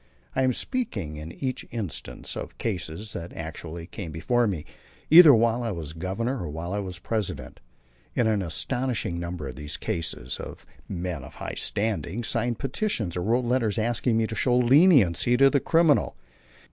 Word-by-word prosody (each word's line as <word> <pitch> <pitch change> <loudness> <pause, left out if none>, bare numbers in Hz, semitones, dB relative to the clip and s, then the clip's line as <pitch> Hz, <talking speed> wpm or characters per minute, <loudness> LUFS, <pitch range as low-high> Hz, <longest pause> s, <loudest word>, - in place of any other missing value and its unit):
I 130 - +2
am 130 -1 +3
speaking 100 - -3
in 80 +2 -7
each 130 +6 -4
instance 105 -8 -5
of - - -7
cases 100 0 -4
that 85 0 -6
actually 80 +1 -7
came 90 -2 -7
before 120 +10 +1
me, 85 -7 -3 0.5
either 165 -1 +11
while 115 -1 +3
I 120 - -1
was 80 -6 -5
Governor 100 +10 -2
or 85 - -4
while 85 +5 -5
I 105 - 0
was 95 -3 -5
President. 105 +3 -3 0.6
In 120 - +2
an 110 -2 +2
astonishing 115 +1 -2
number 85 -4 -4
of - - -9
these 75 0 -5
cases 65 -6 -3 0.5
men 85 -5 -4
of - - -12
high - - -5
standing 110 0 -2
signed 115 0 -1
petitions 130 - -2
or 90 - -1
wrote 120 +6 +1
letters 120 -4 +1
asking 115 +1 +1
me 115 - +2
to 110 - -5
show 120 +3 +2
leniency 125 - +5
to 135 +1 +6
the 140 - +3
criminal. 165 - +3
110 Hz, 170 wpm, -26 LUFS, 85-125 Hz, 0.6 s, either